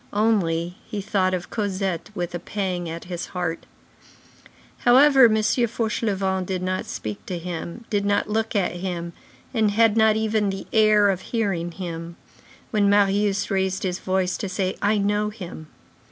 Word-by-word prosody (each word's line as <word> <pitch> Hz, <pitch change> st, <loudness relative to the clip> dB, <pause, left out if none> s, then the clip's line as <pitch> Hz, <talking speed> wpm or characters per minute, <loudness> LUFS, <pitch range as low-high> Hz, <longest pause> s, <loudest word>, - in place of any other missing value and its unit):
Only, 180 Hz, -5 st, +1 dB
he 210 Hz, -, -3 dB
thought 190 Hz, -2 st, +1 dB
of 180 Hz, 0 st, -6 dB
Cosette 195 Hz, -4 st, -2 dB
with 175 Hz, -2 st, -3 dB
a 175 Hz, -, -3 dB
pang 180 Hz, -4 st, -3 dB
at 165 Hz, +1 st, -6 dB
his 175 Hz, -1 st, -5 dB
heart. 170 Hz, -2 st, -3 dB, 1.1 s
However, 265 Hz, +2 st, +7 dB
M. 220 Hz, -2 st, +4 dB
Fauchelevent 215 Hz, -4 st, 0 dB
did 185 Hz, -1 st, -2 dB
not 185 Hz, 0 st, -2 dB
speak 105 Hz, -1 st, -5 dB
to 180 Hz, -, -3 dB
him, 170 Hz, +5 st, -6 dB
did 205 Hz, -2 st, +1 dB
not 205 Hz, 0 st, +1 dB
look 220 Hz, +1 st, -1 dB
at 180 Hz, -3 st, 0 dB
him, 175 Hz, -2 st, -4 dB, 0.4 s
and 220 Hz, -3 st, +3 dB
had 220 Hz, +1 st, +3 dB
not 220 Hz, -1 st, +5 dB
even 215 Hz, -1 st, +1 dB
the 195 Hz, 0 st, -5 dB
air 215 Hz, -2 st, +5 dB
of 190 Hz, -1 st, -3 dB
hearing 195 Hz, -7 st, -1 dB
him, 170 Hz, -2 st, -6 dB, 0.6 s
when 205 Hz, -2 st, +3 dB
Marius 200 Hz, 0 st, +2 dB
raised 190 Hz, -1 st, 0 dB
his 185 Hz, -1 st, -2 dB
voice 185 Hz, -1 st, 0 dB
to 200 Hz, -, -4 dB
say: 185 Hz, 0 st, -1 dB
"I 210 Hz, +1 st, +2 dB
know 205 Hz, +1 st, +1 dB
him." 180 Hz, -7 st, -9 dB
195 Hz, 160 wpm, -23 LUFS, 180-215 Hz, 1.1 s, However